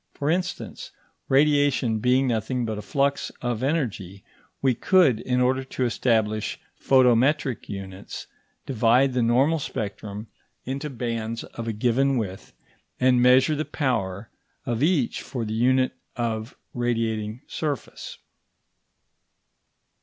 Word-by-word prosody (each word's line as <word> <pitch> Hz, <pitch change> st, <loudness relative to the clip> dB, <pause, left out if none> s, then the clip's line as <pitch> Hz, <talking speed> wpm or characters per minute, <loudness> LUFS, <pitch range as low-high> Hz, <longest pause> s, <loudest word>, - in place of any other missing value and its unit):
For 145 Hz, +2 st, 0 dB
instance, 180 Hz, 0 st, -3 dB, 0.4 s
radiation 140 Hz, -5 st, +3 dB
being 125 Hz, +4 st, +3 dB
nothing 120 Hz, +1 st, -1 dB
but 110 Hz, -2 st, -3 dB
a -, -, -5 dB
flux 140 Hz, +6 st, 0 dB
of 120 Hz, -2 st, -1 dB
energy, 115 Hz, -, -2 dB, 0.4 s
we 130 Hz, -2 st, +2 dB
could, 155 Hz, -, +4 dB
in 125 Hz, 0 st, 0 dB
order 130 Hz, +1 st, +2 dB
to 130 Hz, -1 st, -2 dB
establish 110 Hz, -3 st, 0 dB, 0.2 s
photometric 130 Hz, +1 st, +3 dB
units, 95 Hz, -1 st, -7 dB, 0.4 s
divide 125 Hz, +2 st, +3 dB
the 125 Hz, -, +1 dB
normal 130 Hz, +8 st, +3 dB
spectrum 105 Hz, -4 st, -5 dB, 0.4 s
into 135 Hz, +4 st, -4 dB
bands 115 Hz, -3 st, -3 dB
of 115 Hz, 0 st, -8 dB
a -, -, 0 dB
given 125 Hz, +5 st, +2 dB
width, 95 Hz, -5 st, -5 dB, 0.5 s
and 125 Hz, -1 st, +4 dB
measure 130 Hz, +4 st, +5 dB
the 150 Hz, -, -1 dB
power 110 Hz, -9 st, -2 dB, 0.3 s
of 120 Hz, 0 st, -2 dB
each 150 Hz, -6 st, +1 dB
for 120 Hz, -4 st, -4 dB
the 110 Hz, -, -4 dB
unit 130 Hz, +3 st, +2 dB, 0.2 s
of 115 Hz, -1 st, -3 dB, 0.2 s
radiating 115 Hz, -2 st, -1 dB
surface. 145 Hz, -6 st, -5 dB
125 Hz, 120 wpm, -25 LUFS, 110-135 Hz, 0.5 s, measure